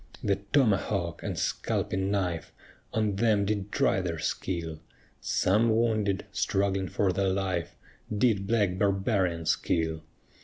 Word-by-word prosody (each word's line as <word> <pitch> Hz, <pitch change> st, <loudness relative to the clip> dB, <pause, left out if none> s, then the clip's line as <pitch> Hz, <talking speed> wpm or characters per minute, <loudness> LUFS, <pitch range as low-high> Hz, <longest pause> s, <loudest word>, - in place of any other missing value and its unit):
The 100 Hz, -2 st, +2 dB
tomahawk 100 Hz, -, +1 dB
and -, -, -4 dB
scalping 95 Hz, 0 st, -1 dB
knife 90 Hz, -5 st, -1 dB, 0.4 s
On 105 Hz, -3 st, 0 dB
them 105 Hz, -2 st, +3 dB
did 105 Hz, -1 st, -2 dB
try 95 Hz, -, +2 dB
their 85 Hz, -2 st, -3 dB
skill; 80 Hz, 0 st, -3 dB, 0.4 s
Some 110 Hz, +5 st, +2 dB
wounded, 110 Hz, -3 st, +1 dB
struggling 95 Hz, -1 st, 0 dB
for 95 Hz, -3 st, +1 dB
their 95 Hz, +1 st, +1 dB
life, 95 Hz, -3 st, -2 dB, 0.4 s
Did 105 Hz, -2 st, +2 dB
black 100 Hz, -5 st, +1 dB
barbarians 95 Hz, -4 st, +1 dB
kill. 80 Hz, -1 st, -1 dB
95 Hz, 120 wpm, -28 LUFS, 90-105 Hz, 0.4 s, them